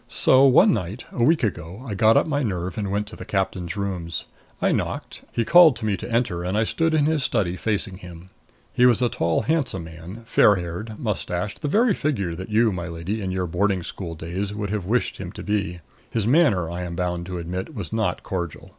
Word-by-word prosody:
So 130 +1 +5
one 130 - +6
night, 100 +2 -4
a 120 - -1
week 160 +4 +3
ago, 95 +3 -3
I 105 - -3
got 110 +3 +4
up - - +4
my 145 -2 0
nerve 90 -7 -2
and 100 -2 -3
went 100 +2 -1
to - - -10
the - - -8
captain's 95 -2 -2
rooms. 90 -4 -3 0.3
I - - +2
knocked. - - -3
He 115 - -1
called 165 0 +7
to 115 - -5
me 105 -2 +1
to - - -7
enter 115 -8 0
and 90 +3 -1
I 110 - +3
stood 165 +7 +1
in 150 -2 +3
his 155 -1 +1
study, 105 -10 0
facing 100 -2 -1
him. 90 0 -12 0.4
He 125 - +5
was 125 0 +3
a 120 - +3
tall 85 -5 0
handsome 140 - 0
man, 80 +7 -10
fair 105 -2 +5
haired, 90 +5 -5
mustached 100 -3 -3
the 150 - -1
very 220 - +3
figure 110 - -1
that 95 +5 -7
you, 110 +1 +3
my 90 -2 -4
lady, 85 +6 -4
in 95 - -3
your 95 0 -1
boarding 90 +2 0
school 85 -1 -6
days, 95 +6 -4
would 105 -2 -3
have 105 -4 -2
wished 125 +4 0
him - - -6
to - - -8
be. 100 -4 -2 0.3
His 110 -3 -1
manner, 115 - +3
I 85 +2 -5
am 85 -1 -5
bound 90 0 -2
to 90 -1 -4
admit, 90 - -5
was 100 -2 -5
not 110 -5 -1
cordial. 85 -3 -5
100 Hz, 225 wpm, -23 LUFS, 90-115 Hz, 0.4 s, called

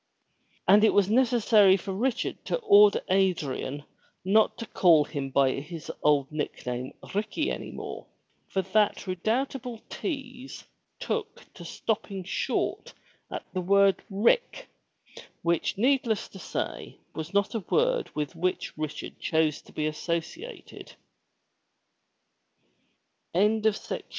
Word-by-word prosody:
And 205 +3 +7
it 220 - +4
was 205 0 +3
necessary 225 -5 +5
for 195 +1 -5
Richard 235 +5 -2
to - - 0
order 205 - +6
Adrian 155 -7 0 0.4
not 215 +3 +3
to 230 - -5
call 170 -8 +5
him 140 -3 -4
by 135 0 +3
his 155 +2 -7
old 145 -2 +2
nickname 130 -4 -4 0.2
Ricky 215 +10 -1
any - - -5
more, - - -7 0.4
for 190 - -1
that 205 +3 +1
redoubtable 230 +6 -2
tease 270 -4 -6 0.4
took 450 -1 -4
to - - -11
stopping 200 -3 -3
short 185 - -2 0.3
at - - -6
the 185 - -1
word 195 +1 +4
Rick 235 - +1 0.7
which, 170 +2 0
needless 240 -2 +1
to 190 - -12
say, - - -5 0.2
was 160 +1 -6
not 200 0 +1
a 225 - -1
word - - +2
with 150 -1 -3
which 180 +2 -2
Richard 155 -1 -5
chose 160 -2 +1
195 Hz, 110 wpm, -27 LUFS, 165-230 Hz, 0.7 s, And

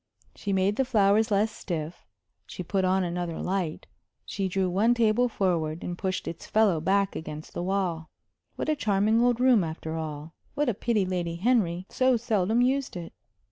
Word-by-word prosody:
She 205 - -4
made 195 +2 +1
the 265 - +3
flowers 215 -3 +3
less 210 +2 +2
stiff; 165 - -6 0.4
she 180 - -6
put 190 +2 -1
on 185 +1 +2
another 175 -1 -3
light; 180 -4 -2 0.4
she 195 -1 -2
drew 190 0 0
one 210 +7 +2
table 235 +1 +3
forward 170 -6 -1
and 175 - -4
pushed 185 +1 -3
its 165 0 -6
fellow 205 -7 +3
back 195 +3 +1
against 155 -1 -7
the - - -3
wall. 180 -4 -1 0.5
What - - -4
a 310 - +2
charming 215 -2 +2
old 245 -1 +2
room, 250 -6 +5
after 160 0 -5
all! 155 0 -6 0.2
What 295 -3 +1
a - - +1
pity 215 -1 0
Lady 175 -2 -2
Henry 185 -3 +1
so 255 -1 +2
seldom 220 0 +1
used 265 -4 0
it! 170 -1 -8
195 Hz, 180 wpm, -27 LUFS, 175-220 Hz, 0.5 s, room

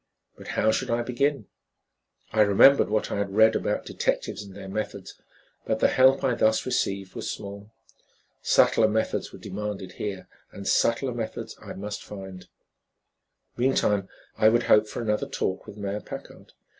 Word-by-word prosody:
But - - -13
how 110 - +4
should - - -2
I 120 +1 +1
begin? 125 0 0 0.9
I 110 - +4
remembered 105 +7 +6
what 110 0 0
I - - -1
had 100 -1 -3
read 110 +1 +6
about - - -1
detectives - - -2
and 100 -2 -11
their 100 -1 -9
methods, 105 +3 -5 0.5
but 110 - -1
the - - +3
help 130 +1 +4
I 130 -2 +2
thus 110 -1 +2
received 100 -6 -1
was - - -5
small. 100 +1 -7 0.7
Subtler 110 - +4
methods 110 +1 -1
were - - -11
demanded 100 -1 -5
here 95 -1 -5 0.2
and 100 - -8
subtler 120 +2 +2
methods 115 -2 -5
I - - -8
must 100 +1 -6
find. 95 -3 -9 1.1
Meantime, 105 -6 +1 0.3
I 110 - +6
would 120 +1 +2
hope 105 0 +4
for 110 - -5
another 105 -1 -1
talk 95 - -3
with 105 - -10
Mayor 100 0 -3
Packard. - - -10
105 Hz, 160 wpm, -26 LUFS, 100-115 Hz, 1.1 s, remembered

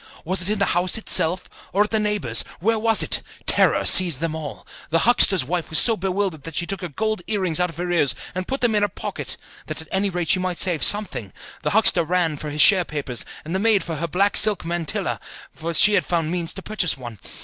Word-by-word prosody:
Was 185 +3 0
it 180 - -2
in 215 - -1
the 200 - +1
house 175 +3 0
itself, 180 -4 +2 0.2
or 200 +2 +2
at 210 - -7
a 220 - +2
neighbour's? 210 - +1 0.2
Where 225 +4 0
was 225 0 +3
it? - - 0 0.2
Terror - - +2
seized 170 -5 +5
on 165 -2 -2
all. 155 -3 -8 0.2
The 165 - +1
huckster's 195 - +4
wife 175 +3 -4
was 160 - -1
so 225 +6 +5
bewildered 190 -4 -3
that 165 +2 -9
she 175 - 0
took 195 0 -5
her 180 - -4
gold 215 +6 -3
earrings 185 -7 -1
out 180 0 0
of 165 - -13
her 175 0 -4
ears 155 -6 +1 0.2
and 185 0 -5
put 270 - -4
them 240 -2 +2
in 210 - +1
her 205 - +1
pocket, - - -5 0.3
that - - -6
at 160 - -8
any 195 +1 0
rate 175 -3 -4
she 185 - +4
might 180 -1 -3
save 175 -5 +2
something; 205 - +2 0.3
the - - -2
huckster 200 -5 +4
ran 170 -1 -1
for 150 - -7
his 150 +1 0
share 190 -4 +5
papers; 145 -6 -4 0.2
and 160 - -6
the 190 - -1
maid 210 -3 +2
for 165 -2 -6
her 170 +3 -3
black 195 +5 0
silk 210 -6 +3
mantilla, 170 -1 -3 0.3
for 165 +1 -6
she 190 +5 +5
had - - +2
found 165 -2 -2
means 170 -2 -1
to 195 - -9
purchase 180 -9 0
one. 120 -5 -10
180 Hz, 240 wpm, -21 LUFS, 160-205 Hz, 0.3 s, seized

